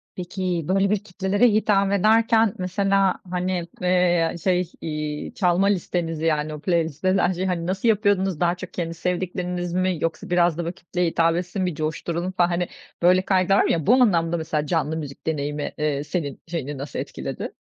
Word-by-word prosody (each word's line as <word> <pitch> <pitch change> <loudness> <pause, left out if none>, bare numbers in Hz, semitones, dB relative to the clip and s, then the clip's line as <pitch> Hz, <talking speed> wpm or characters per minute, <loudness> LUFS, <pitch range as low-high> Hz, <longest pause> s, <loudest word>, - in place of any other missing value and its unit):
Peki, 180 -2 -3
böyle 195 +1 +2
bir 205 -1 0
kitlelere 200 +3 +1
hitap 205 -2 +2
ederken 220 +2 +4
mesela, 195 +1 +1 0.2
hani, 180 -1 -1
eee, 180 -2 +2
şey, 180 -2 +1
iii, 150 -1 -4
çalma 180 0 +2
listenizi 170 -4 -1
yani 155 -1 0
o 150 - -7
playlist 165 -4 -1
denen 185 0 +3
şeyi 185 +1 -2
hani 170 -2 -2
nasıl 195 +5 -1
yapıyordunuz? 200 -5 +2
Daha 175 0 +2
çok 180 0 -9
kendi 165 -2 -3
sevdikleriniz 180 0 -3
mi 185 -1 +1
yoksa 165 0 -3
biraz 175 -2 +3
da 175 - -2
böyle 170 +2 -3
kitleye 180 -1 -2
hitap 165 0 +2
etsin, 180 +2 -2
bir 180 -4 -2
coşturalım 165 +4 -3
falan 175 -2 +2
hani 175 0 -1 0.3
böyle 180 +2 +5
kaygılar 190 0 +2
var - - +3
ya, 160 -4 0
bu 240 - +7
anlamda 170 -9 +3
mesela 155 -2 -2
canlı 160 -2 0
müzik 145 -2 -8
deneyimi, 145 -1 -2
eee, 150 -2 -1
senin 150 -2 -4
şeyini 150 -4 -4
nasıl 140 +2 -5
etkiledi? - - -5
180 Hz, 175 wpm, -23 LUFS, 165-190 Hz, 0.3 s, bu